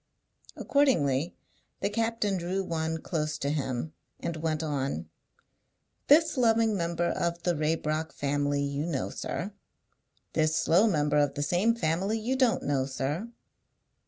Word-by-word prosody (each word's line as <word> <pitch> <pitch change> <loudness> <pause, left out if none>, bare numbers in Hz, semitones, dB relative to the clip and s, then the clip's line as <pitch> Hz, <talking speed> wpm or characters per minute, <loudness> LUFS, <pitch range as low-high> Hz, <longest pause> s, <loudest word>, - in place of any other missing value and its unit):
Accordingly 170 - +2 0.5
the - - +1
captain 225 -2 0
drew 185 +2 -2
one 160 -2 -2
close 155 -3 -2
to 140 - -1
him, 140 0 -2 0.3
and 170 - -3
went 155 0 -1
on: 135 - -2 1.0
"This 315 +1 +5
loving 225 -3 +3
member 170 -1 -1
of 170 0 -2
the 175 - +2
Raybrock 155 +1 -1
family 145 0 0
you 140 +2 -2
know, 140 -6 -2
sir. 195 +4 -4 0.8
This 155 0 +2
slow 185 +9 +4
member 150 -6 +2
of 145 -1 +1
the 145 - -1
same 190 +9 +2
family 195 +3 0
you 235 +4 -1
don't 255 -3 +2
know, 135 -2 0
sir. 145 - -3
160 Hz, 135 wpm, -28 LUFS, 145-205 Hz, 1.0 s, This